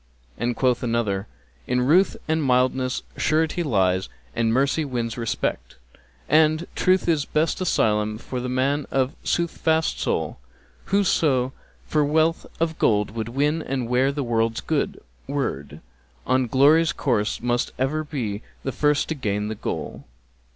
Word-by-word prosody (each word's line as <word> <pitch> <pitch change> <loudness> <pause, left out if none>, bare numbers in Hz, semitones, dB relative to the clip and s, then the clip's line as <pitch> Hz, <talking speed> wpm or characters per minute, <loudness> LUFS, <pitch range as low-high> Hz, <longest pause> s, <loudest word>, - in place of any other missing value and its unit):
And 120 +1 -1
quoth 125 -1 +1
another, 110 -4 -1 0.4
'In 125 0 +1
ruth 170 +10 +3
and 160 0 +1
mildness 130 0 +1
surety 160 +3 +1
lies 95 - +1 0.3
and 115 -1 +1
mercy 140 +6 +2
wins 120 -5 -3
respect, 115 - -3 0.3
* 65 0 -33
And 155 +2 +4
Truth 185 0 +2
is 155 -4 +2
best 160 +4 0
asylum 110 -10 +1
for 125 +2 -5
the 125 +1 -3
man 135 +3 0
of 135 +1 0
soothfast 160 -2 0
soul: - - -1 0.5
Whoso 150 -10 +2 0.3
for 150 -1 +1
wealth 160 +3 +1
of 160 -1 -1
gold 105 -1 +2
would 115 0 -4
win 145 +6 0
and 130 -5 -3
wear 125 +3 +2
the 140 0 -3
world's 115 -1 0
good - - -1 0.3
word, 135 - -3 0.2
* 65 - -36
On 130 0 +2
glory's 150 +6 +4
course 115 -6 0
must 120 0 0
ever 145 +5 0
be 120 -9 -4 0.2
the 135 - -2
first 150 +3 +1
to - - 0
gain 105 -7 -2
the - - -2
goal.'" 110 - -5
130 Hz, 150 wpm, -24 LUFS, 115-155 Hz, 0.5 s, And